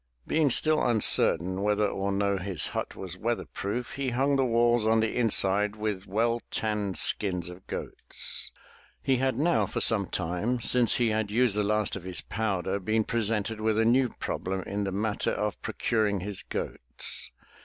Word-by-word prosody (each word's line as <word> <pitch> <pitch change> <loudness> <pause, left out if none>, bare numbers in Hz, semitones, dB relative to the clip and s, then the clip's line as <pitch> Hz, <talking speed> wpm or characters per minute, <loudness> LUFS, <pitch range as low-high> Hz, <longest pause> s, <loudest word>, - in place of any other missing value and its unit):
Being 155 -2 +2
still 155 +5 +3
uncertain 95 -5 +2
whether 105 0 +2
or 100 0 -2
no 100 0 0
his 90 -2 +1
hut - - -3
was 90 -1 -8
weather 115 +1 -1
proof, 115 +5 -4
he 135 -1 -2
hung 135 +4 +1
the 135 - +2
walls 120 -1 +3
on 110 +1 +3
the 110 0 0
inside 105 -3 +2
with 105 -3 -3
well 115 +4 0
tanned 105 -3 -2
skins 90 -4 +1
of 90 +1 -12
goats. - - -3 0.5
He 135 -1 +2
had 130 -1 0
now 170 +5 +2
for - - -3
some 100 -4 +3
time, 95 +8 -2
since 120 0 +4
he 120 -2 +2
had 110 -1 -1
used 115 0 +2
the 105 - +1
last 105 0 0
of 100 - -6
his 90 -1 -3
powder, 100 -3 -2
been 110 +3 0
presented 110 -1 -1
with 110 0 +1
a 110 - +3
new 125 +2 +3
problem 95 -2 -4
in 100 0 -3
the 95 - -2
matter 105 +2 -1
of 105 -2 -3
pro - - -5
curing 105 -4 0
his 100 0 -3
goats. - - -3
105 Hz, 180 wpm, -28 LUFS, 100-115 Hz, 0.5 s, since